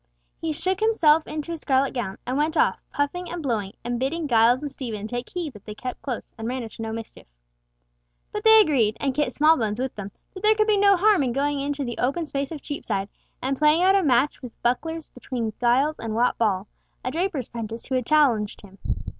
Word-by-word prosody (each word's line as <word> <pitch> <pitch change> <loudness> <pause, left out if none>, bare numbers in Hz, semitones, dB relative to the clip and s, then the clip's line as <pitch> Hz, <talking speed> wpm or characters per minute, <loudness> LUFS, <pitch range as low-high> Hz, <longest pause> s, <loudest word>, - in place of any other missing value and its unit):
He 325 - -2
shook 370 +5 -1
himself 325 -9 +4
into 305 +2 -4
his 330 -2 -5
scarlet 270 -1 +2
gown, 235 -7 -3
and 255 - -2
went 310 +3 0
off, - - +2
puffing 320 +5 -2
and 345 -2 -5
blowing, 215 -7 -2
and 240 0 -2
bidding 300 +5 -1
Giles 240 +2 +4
and 290 - -4
Stephen 220 -7 -5
take 245 +2 -5
heed 340 -6 -4
that 210 -2 -14
they 210 - -8
kept 250 +2 -6
close, 250 -5 -5
and 225 - -4
ran 255 0 -3
into 225 0 -9
no 225 0 -3
mischief. 225 - -8 1.0
But 420 - -4
they 445 0 +8
agreed, 240 - +2
and 275 -2 0
Kit 295 +2 0
Smallbones 275 -9 +3
with 260 0 -2
them, 200 -1 -7 0.2
that 375 - -9
there 430 +1 +5
could 430 0 +3
be 425 -1 +3
no 400 -1 +5
harm 410 -1 +4
in 250 -3 0
going 285 +2 0
into 285 0 -2
the 240 -1 -5
open 275 +7 0
space 280 -1 -3
of 305 -3 -7
Cheapside 200 -8 -3 0.3
and 270 +1 0
playing 305 +3 +4
out 380 +1 +5
a 395 - +4
match 275 -2 +2
with 250 -3 -10
bucklers 320 +7 -1
between 235 -2 -4
Giles 265 +6 +2
and 225 -1 -4
Wat 245 +2 +2
Ball, 200 -4 +1 0.4
a 255 - -1
draper's 325 - -2
prentice 230 -1 -6
who - - -5
had 255 -2 0
challenged 250 -9 +2
him. 195 -1 -16
270 Hz, 220 wpm, -24 LUFS, 235-315 Hz, 1.0 s, they